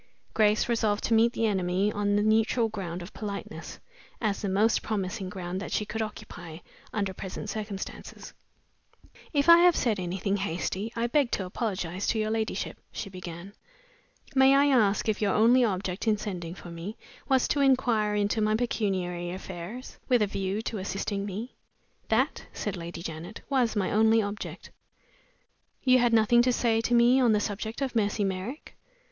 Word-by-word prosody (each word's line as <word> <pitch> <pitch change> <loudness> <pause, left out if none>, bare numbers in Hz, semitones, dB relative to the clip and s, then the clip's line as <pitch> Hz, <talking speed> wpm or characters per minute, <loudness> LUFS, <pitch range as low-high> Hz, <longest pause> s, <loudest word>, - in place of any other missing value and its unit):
Grace 215 -1 +3
resolved 220 -3 +1
to 230 - +1
meet 225 +1 +5
the 230 - 0
enemy 190 0 +1
on 205 -1 0
the 205 - +2
neutral 220 +2 +2
ground 180 -5 -5
of 180 - -11
politeness, 205 -2 -6 0.4
as 210 -3 -1
the 200 - -2
most 210 +4 +2
promising 195 -2 -3
ground 185 0 -5
that - - -6
she 210 - 0
could 225 +1 -4
occupy 180 -6 -7 0.3
under 200 -3 -2
present 185 0 -6
circumstances. 205 -3 -7 1.0
"If 285 -1 +1
I 335 0 +9
have 350 -1 +6
said 220 -5 +1
anything 190 +2 -1
hasty, 195 +3 -3
I 230 0 0
beg 260 +1 +2
to 190 - -1
apologize 185 -2 -3
to - - +1
your 215 0 0
ladyship," 220 -1 -2
she 200 - -6
began. 180 +1 -8 0.8
"May 265 0 +6
I 280 0 +5
ask 210 -3 +2
if 215 -1 0
your 200 -3 +2
only 240 +4 +5
object 190 -1 -2
in 215 -1 +3
sending 180 -5 -5
for 170 0 -10
me 170 +6 -7 0.3
was 265 -2 +3
to 290 - +1
inquire 240 -6 +3
into 205 +1 +1
my 215 0 +2
pecuniary 185 -7 -1
affairs, 185 +6 -7
with 245 -4 +4
a - - +3
view 195 +1 -3
to 225 -3 -3
assisting 200 +1 -3
me?" 215 +6 -5 0.6
"That," - - +1
said 205 -2 -3
Lady 170 -1 -7
Janet, 170 +5 -7
"was 250 -5 +1
my 195 -3 0
only 220 +1 +4
object." 205 0 -5 1.1
"You 255 -1 +5
had 240 -1 +3
nothing 230 +1 +5
to 250 +1 +3
say 230 -2 +2
to 240 +1 +1
me 240 +2 +5
on 240 -3 +4
the 210 - +3
subject 220 +5 -3
of 260 -3 -3
Mercy 205 -1 +1
Merrick?" 195 +9 -4
210 Hz, 175 wpm, -28 LUFS, 190-230 Hz, 1.1 s, I